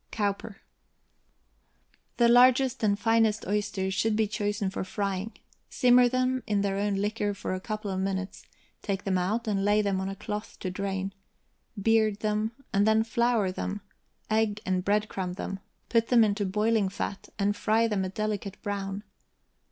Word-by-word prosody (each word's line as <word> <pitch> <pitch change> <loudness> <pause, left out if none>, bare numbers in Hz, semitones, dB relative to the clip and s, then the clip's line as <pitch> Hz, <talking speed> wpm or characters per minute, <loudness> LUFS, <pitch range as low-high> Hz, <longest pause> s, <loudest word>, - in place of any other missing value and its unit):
COWPER. 205 0 -2 1.6
The 235 - +5
largest 255 +2 +5
and 205 -2 +2
finest 225 -1 +2
oysters 195 -1 -1
should 215 +2 +1
be 220 0 +2
chosen 205 -2 -2
for - - -3
frying. 200 +2 -3 0.4
Simmer 245 -1 +5
them 255 +1 0
in 205 -2 +1
their 195 -1 0
own 205 0 0
liquor 205 0 -1
for 190 - -4
a 185 - -2
couple 215 0 -4
of 190 - -2
minutes; 190 0 -3 0.3
take 200 -1 -3
them 190 -2 +1
out, 220 +6 -1
and 200 -2 0
lay 205 +1 +3
them 195 -2 0
on 190 - -3
a 195 - -5
cloth 210 +1 -6
to 185 - -3
drain; 195 0 -3 0.7
beard 215 0 +2
them, 215 +1 0 0.2
and 200 +2 +3
then 220 0 +4
flour 230 -3 +1
them, 200 +2 -4 0.5
egg 215 -1 +1
and 185 -1 0
breadcrumb 200 -3 -1
them, 195 0 -5 0.3
put 230 -1 +2
them 240 -2 +5
into 205 -1 0
boiling 210 +1 +1
fat, 200 0 -5
and 205 0 +1
fry 225 +2 +2
them 205 -3 0
a 185 - -2
delicate 210 0 -3
brown. 200 0 -3
205 Hz, 165 wpm, -28 LUFS, 195-220 Hz, 1.6 s, The